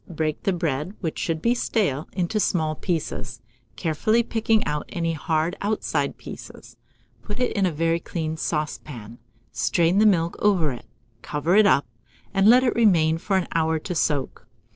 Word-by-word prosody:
Break 155 -2 -2
the 195 - +1
bread, 165 +1 -2
which 160 -5 -3
should 160 -1 -2
be 235 - +4
stale, 195 - -1
into 185 +3 -1
small 160 -6 +1
pieces, 155 - -3 0.4
carefully 195 - +1
picking 225 -1 +1
out 150 0 -3
any 165 -1 -1
hard 160 +2 -1
outside 210 +1 -1
pieces; - - -11 0.5
put 210 +2 -6
it 250 - 0
in 195 -3 +2
a - - -1
very 165 +2 0
clean 160 -2 -4
saucepan, 150 -8 -4 0.3
strain 170 +3 +2
the 215 - +6
milk 170 -4 +2
over 185 -8 +2
it, 120 - -9 0.3
cover 155 +5 0
it 215 -1 +6
up, 140 - +4 0.5
and 195 +1 +4
let 250 +2 +7
it 245 - +2
remain 165 -8 +3
for 195 +2 0
an 185 - -1
hour 160 -1 +1
to 160 - -5
soak. 145 -4 -1
165 Hz, 165 wpm, -24 LUFS, 155-200 Hz, 0.5 s, let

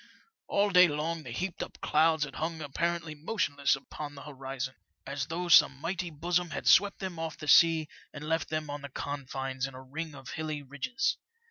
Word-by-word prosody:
All 200 0 +2
day 180 -1 +8
long 160 +2 -2
the 130 - -9
heaped 175 +9 -3
up - - -6
clouds 160 0 +3
had 150 - -5
hung 160 +1 -2
apparently 165 +2 -2
motionless 145 -4 0
upon 145 +2 -8
the 140 - -9
horizon, 135 -2 -5 0.3
as 140 0 -3
though 175 +2 -3
some 150 -5 +7
mighty 175 +3 -2
besom 175 +3 0
had - - -5
swept 205 -1 +6
them 185 -4 -5
off 160 -1 -4
the 150 - -8
sea 160 0 +6 0.2
and 150 0 -8
left 160 0 0
them 155 -1 -2
on 145 0 -5
the 140 - -7
confines 135 -1 -4
in 135 - -11
a 130 - -9
ring 150 +3 -6
of 135 -1 -10
hilly 155 -2 -4
ridges. 145 - -1
155 Hz, 195 wpm, -30 LUFS, 140-170 Hz, 0.3 s, day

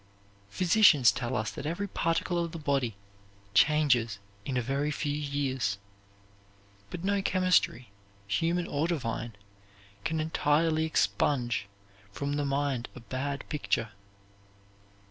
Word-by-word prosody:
Physicians 170 - +5
tell 120 +4 -3
us 110 -2 -1
that 140 - -6
every 175 +6 -2
particle 170 0 0
of 170 - -5
the - - -4
body 140 -7 0 0.6
changes 130 -8 +3 0.3
in 130 - -2
a - - +2
very 140 +4 -1
few 145 -1 -2
years; 140 -7 -1 1.1
but 170 - -6
no 200 +1 +1
chemistry, 180 - +2 0.4
human 165 - +1
or 145 +3 -1
divine, 120 - -3 0.7
can 160 +6 -1
entirely 155 0 +2
expunge 120 -8 +1 0.4
from 140 +7 -3
the 145 0 0
mind 140 -3 -1
a - - -8
bad 130 +4 -4
picture. 120 -7 -1
145 Hz, 120 wpm, -29 LUFS, 125-160 Hz, 1.1 s, Physicians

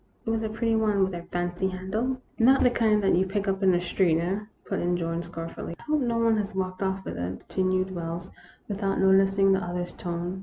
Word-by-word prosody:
It 225 - 0
was 225 0 0
a 220 - -2
pretty 225 +1 0
one 210 -3 +2
with 190 0 0
a 175 - -4
fancy 175 +1 -1
handle." 210 +8 -2
" - - -32
Not 270 - +5
the 250 - +5
kind 215 -3 +2
that 195 - +3
you 180 - +4
pick 200 +1 -2
up 195 0 0
in 190 - +4
the 175 - +3
street, 175 -2 +2
eh? 180 +4 -1
" - - -39
put 195 - -2
in 175 0 +1
George, 165 0 -2
scornfully. 165 0 -6
" - - -35
I - - -13
hope 305 0 +1
that 255 - 0
no 230 -1 0
one 230 -1 +3
has 200 -2 -3
walked 185 0 -3
off 190 0 -1
with - - -5
it," 90 +2 -5
con 190 - -1
tinued 185 0 +1
Wells, 170 0 -5 0.4
without 195 -1 -1
noticing 195 0 +4
the 190 -1 +1
other's 175 0 -4
tone. 175 +2 -4
190 Hz, 260 wpm, -27 LUFS, 175-210 Hz, 0.4 s, Not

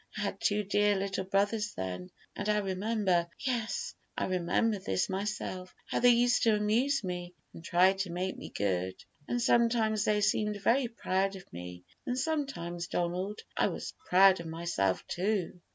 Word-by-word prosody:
I - - -2
had 200 -1 -3
two 210 0 +2
dear 205 +1 +2
little 195 -1 -2
brothers 205 +2 0
then, 90 -1 -4 0.3
and 205 +1 -3
I 210 - +3
remember 195 -2 +1 0.2
yes, 255 - -1 0.2
I - - 0
remember 185 +4 +1
this 95 - -1
myself 190 -2 -4
how - - -1
they 245 - +6
used 240 0 +4
to 225 -2 +4
amuse 225 +6 +1
me 180 -1 -5 0.2
and 165 - -11
try 180 +3 +4
to 195 -1 -3
make 180 +2 -2
me - - -8
good. 95 -2 -1 0.3
And 245 - 0
sometimes 230 -3 +3
they 210 -1 +2
seemed 210 +1 +1
very 240 +5 +2
proud 195 -4 -1
of 190 - -9
me, 90 +1 -8 0.2
and 250 - -1
sometimes, 260 - -2
Donald, 180 +5 -2
I - - +3
was - - -5
proud 190 0 +6
of 170 - -6
myself, 160 - -1
too. 185 -2 -2
195 Hz, 170 wpm, -31 LUFS, 175-215 Hz, 0.3 s, they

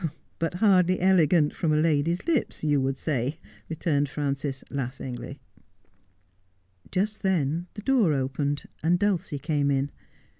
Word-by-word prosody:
' - - -41
But 165 +1 -1
hardly 185 -2 +4
elegant 175 -4 +4
from 165 -3 0
a 150 - +3
lady's 160 +2 +2
hps, 305 - -1
you 145 -2 +3
would 135 0 -1
say,' 140 0 -1 0.3
returned 150 -3 0
Frances, 140 -1 -3
laughing. 130 -2 -5 1.5
Just 210 +3 -1
then 170 -3 0
the 210 - -7
door 245 - +3
opened 140 +1 -1 0.2
and 170 +3 +3
Dulcie 185 -6 0
came 145 0 0
in. 140 0 0
155 Hz, 135 wpm, -26 LUFS, 140-180 Hz, 1.5 s, hardly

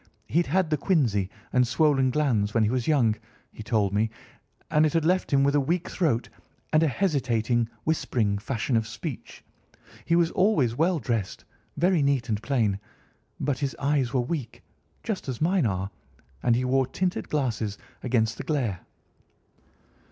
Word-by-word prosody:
He'd 170 +2 +1
had 175 +2 +1
the 150 - +1
quinsy 120 - +1 0.2
and 125 -1 +4
swollen 135 0 +3
glands 120 -7 +1
when 115 - +4
he 105 - +2
was 125 -2 -1
young, 125 -9 +3 0.4
he - - -9
told 105 -3 0
me, 110 +2 +2 0.6
and 150 - +4
it 155 - +2
had 165 -2 +1
left 185 +2 +2
him 140 -1 +4
with 140 0 +3
a 145 - +4
weak 170 +6 -1
throat, 145 -10 0 0.5
and 155 - +5
a 165 - +4
hesitating, 120 - 0
whispering 115 -10 0
fashion 120 +2 -2
of 110 -1 +1
speech. 130 +4 -7 0.6
He 170 - +2
was 170 -1 +3
always 185 - +2
well 170 +5 +2
dressed, 115 -7 -3 0.3
very 175 -2 +3
neat 140 -4 +1
and 105 -1 -1
plain, 110 -8 0 0.6
but 140 -3 -1
his 140 -2 -2
eyes 140 -3 +1
were 130 -2 +1
weak, 130 -2 -5 0.4
just 200 -10 -3
as 125 - -4
mine 170 -3 +2
are, 95 0 -2 0.5
and 120 -1 +3
he 125 +2 0
wore 130 0 +2
tinted 180 +7 -2
glasses 115 -8 -1 0.2
against 115 -3 0
the - - -3
glare." 125 - -1
130 Hz, 165 wpm, -26 LUFS, 115-155 Hz, 0.6 s, and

